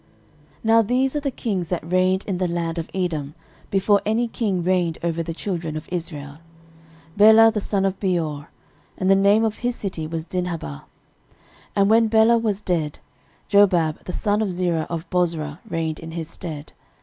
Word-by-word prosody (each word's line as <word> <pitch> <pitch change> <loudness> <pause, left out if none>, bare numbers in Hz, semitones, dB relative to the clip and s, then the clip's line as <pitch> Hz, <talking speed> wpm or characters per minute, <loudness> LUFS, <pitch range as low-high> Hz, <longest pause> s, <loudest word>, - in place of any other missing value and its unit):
13:001:043 - - -31
Now 225 0 +5
these 255 +5 0
are - - +1
the 285 -1 -2
kings 200 -9 -3
that 170 -1 -4
reigned 185 +1 +2
in 185 -3 -3
the 185 - +1
land 170 -1 -2
of 165 - -5
Edom 160 -6 -3 0.3
before 200 +1 +3
any 225 +3 +1
king 200 -6 -1
reigned 175 -2 +1
over 170 -1 -1
the 165 - -4
children 165 -3 -4
of 155 - -8
Israel; 150 -4 -5 0.8
Bela 220 +2 +7
the 215 - -2
son 195 -1 0
of 195 0 -1
Beor: 160 -7 -2 0.5
and 185 0 +2
the - - +7
name 200 +3 +4
of 220 -1 -2
his 245 0 -2
city 180 -8 -4
was 160 0 -4
Dinhabah. 170 - -4
13:001:044 - - -25 0.9
And 200 0 +3
when 225 0 +5
Bela 225 +1 +4
was 210 -3 -1
dead, 165 -7 -1 0.5
Jobab 180 -6 +3
the - - -4
son 205 +3 0
of 205 -3 0
Zerah 175 -3 -1
of 165 -1 -4
Bozrah 165 -4 -1
reigned 160 -3 -2
in 165 - -8
his 165 -2 -4
stead. 155 -5 -7
180 Hz, 185 wpm, -22 LUFS, 165-205 Hz, 0.9 s, Bela